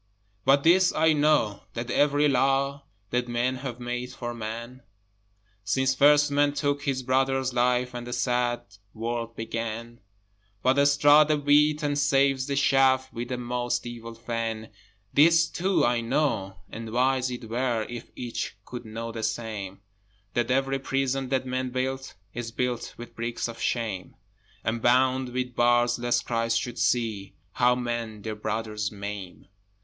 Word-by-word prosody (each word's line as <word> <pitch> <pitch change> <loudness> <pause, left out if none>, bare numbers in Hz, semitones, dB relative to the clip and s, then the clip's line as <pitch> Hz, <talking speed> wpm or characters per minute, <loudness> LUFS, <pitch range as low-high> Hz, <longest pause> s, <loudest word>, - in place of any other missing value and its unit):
But 140 +1 +5
this 180 +2 +5
I 160 0 +3
know, 145 -9 +2
that 120 +1 -4
every 145 +2 +3
Law 140 +1 +1 0.3
That 125 0 0
men 120 +2 0
have 130 -2 -6
made 125 +1 -4
for 120 -2 -5
Man, 115 +3 -6 0.8
Since 130 +5 +1
first 145 +2 +5
Man 145 0 +3
took 145 0 -1
his 130 -2 -1
brother's 130 0 +1
life, 125 0 +1
And 120 0 -6
the - - -6
sad 120 0 0 0.3
world 115 +1 -3
began, 115 +1 -5 0.6
But 135 +2 +4
straws 145 +1 +6
the 155 -1 +2
wheat 150 +1 +3
and 145 0 0
saves 135 -2 +2
the 140 - -1
chaff 130 -1 +3
With 120 +1 -5
a 125 - -1
most 120 0 -2
evil 115 -1 -7
fan. 115 -1 -4 0.4
This 165 +3 +5
too 190 +2 +1
I 120 0 +1
know 115 -6 0 0.2
and 115 0 -6
wise 130 +1 +2
it 120 -2 -6
were 120 -1 -1
If 120 -1 -8
each 120 -2 -4
could 120 -1 -8
know 115 +1 -5
the 115 0 -5
same 110 -3 -4 0.5
That 120 0 0
every 135 +1 +1
prison 135 0 -1
that 130 -1 0
men 130 0 -2
build 130 +1 -3 0.2
Is 120 -1 -5
built 125 0 -3
with 120 0 -10
bricks 115 +1 -3
of 115 0 -8
shame, 110 -6 -2 0.5
And 115 +1 -1
bound 130 +1 +3
with 125 0 -3
bars 120 0 +3
lest 120 0 0
Christ 115 -1 +1
should 120 0 -5
see 105 -5 0 0.2
How 125 +5 +3
men 120 -4 -4
their 110 - -3
brothers 105 0 -3
maim. 100 -3 -7
125 Hz, 155 wpm, -26 LUFS, 115-135 Hz, 0.8 s, straws